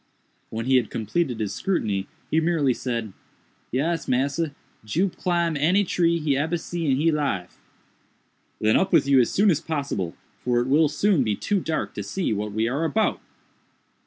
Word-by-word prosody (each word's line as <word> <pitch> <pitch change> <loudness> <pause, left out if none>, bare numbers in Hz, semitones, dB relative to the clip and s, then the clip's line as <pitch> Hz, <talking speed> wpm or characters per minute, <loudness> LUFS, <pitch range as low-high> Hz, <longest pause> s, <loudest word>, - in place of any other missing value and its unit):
When 115 +1 -4
he 130 0 +4
had 120 -4 0
completed 120 +3 -1
his 105 -2 -2
scrutiny, 105 - -1 0.2
he 160 - +4
merely 160 -5 +2
said, 115 -5 -4 0.6
"Yes, 160 +5 -1
massa, 140 +4 0 0.3
Jup 170 - 0
climb 170 -2 0
any 170 +8 +3
tree 170 -2 +1
he 150 -4 0
ebber 160 +5 0
see 170 0 -4
in 130 - +4
he 165 +3 +3
life." 140 - -2 1.0
"Then 110 0 +3
up 190 - +1
with - - +5
you 140 -1 +5
as 120 - +1
soon 205 0 +3
as 160 -1 0
possible, 140 - -3 0.2
for 120 -1 +1
it 120 - 0
will 150 +3 +4
soon 165 0 +2
be 110 -3 0
too 200 - 0
dark 160 -3 -2
to - - -4
see 110 - -2
what 105 0 -3
we 110 +2 0
are 140 +7 -1
about." 215 +7 +1
145 Hz, 180 wpm, -24 LUFS, 115-170 Hz, 1.0 s, with